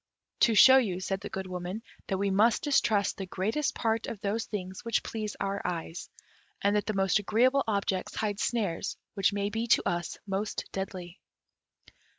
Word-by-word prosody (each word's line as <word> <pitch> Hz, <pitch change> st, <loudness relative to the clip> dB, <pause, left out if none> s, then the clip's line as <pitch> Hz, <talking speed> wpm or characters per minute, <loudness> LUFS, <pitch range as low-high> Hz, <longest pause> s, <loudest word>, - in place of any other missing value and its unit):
"To 230 Hz, -, +4 dB
show 260 Hz, +6 st, +9 dB
you," 190 Hz, -8 st, -1 dB
said 190 Hz, +1 st, -3 dB
the 205 Hz, -, -6 dB
Good 190 Hz, 0 st, -4 dB
Woman, 185 Hz, +4 st, -5 dB, 0.2 s
"that 190 Hz, -, -1 dB
we 200 Hz, 0 st, 0 dB
must 215 Hz, +4 st, +3 dB
distrust 220 Hz, -9 st, +2 dB
the 195 Hz, -, -5 dB
greater 200 Hz, +10 st, -1 dB
part 225 Hz, -1 st, 0 dB
of 220 Hz, -, -5 dB
those 215 Hz, +3 st, -1 dB
things 190 Hz, -3 st, -6 dB
which 230 Hz, -1 st, 0 dB
please 215 Hz, -2 st, -4 dB
our 195 Hz, 0 st, -2 dB
eyes, 170 Hz, -1 st, -4 dB, 0.5 s
and 200 Hz, +1 st, +2 dB
that 210 Hz, -, 0 dB
the 215 Hz, -, -1 dB
most 195 Hz, +1 st, +3 dB
agreeable 255 Hz, +7 st, +3 dB
objects 200 Hz, -3 st, -1 dB
hide 205 Hz, -2 st, -2 dB
snares 210 Hz, -8 st, -1 dB, 0.2 s
which 195 Hz, -1 st, +2 dB
may 200 Hz, 0 st, -1 dB
be 225 Hz, +2 st, -2 dB
to -, -, +3 dB
us 175 Hz, -1 st, -2 dB
most 200 Hz, +1 st, -2 dB
deadly." 185 Hz, -1 st, -6 dB
200 Hz, 175 wpm, -29 LUFS, 190-220 Hz, 0.5 s, show